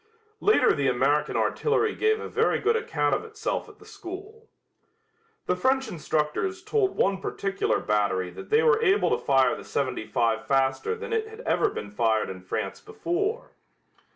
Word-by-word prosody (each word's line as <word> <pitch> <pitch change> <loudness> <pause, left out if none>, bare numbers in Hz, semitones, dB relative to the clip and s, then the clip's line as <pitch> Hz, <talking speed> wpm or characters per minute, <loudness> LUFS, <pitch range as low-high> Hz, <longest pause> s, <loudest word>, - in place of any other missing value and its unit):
Later 425 - +4
the 140 -2 0
American 140 +4 +1
artillery 445 -1 +1
gave 435 0 +1
a - - -5
very - - +1
good 445 +3 +1
account 150 - 0
of - - 0
itself 445 0 -4
at 415 - -16
the 430 - -17
school. 410 +2 -10 1.0
The 180 - +1
French 265 +8 +1
instructors 165 - -2
told 395 -2 0
one 195 0 +1
particular 195 0 -1
battery 95 -3 0
that 90 - -10
they 445 +1 +4
were 455 -2 +4
able 410 -2 +3
to - - 0
fire 135 -2 +3
the - - -9
seventy 130 -5 -2
five 115 -1 0
faster 135 - +1
than 455 +1 -6
it 445 -1 0
had 440 +2 -10
ever 435 - +1
been 105 - -7
fired 110 -1 +1
in 95 -1 -9
France 95 +1 -4
before. 400 - -3
260 Hz, 170 wpm, -26 LUFS, -, 1.0 s, Later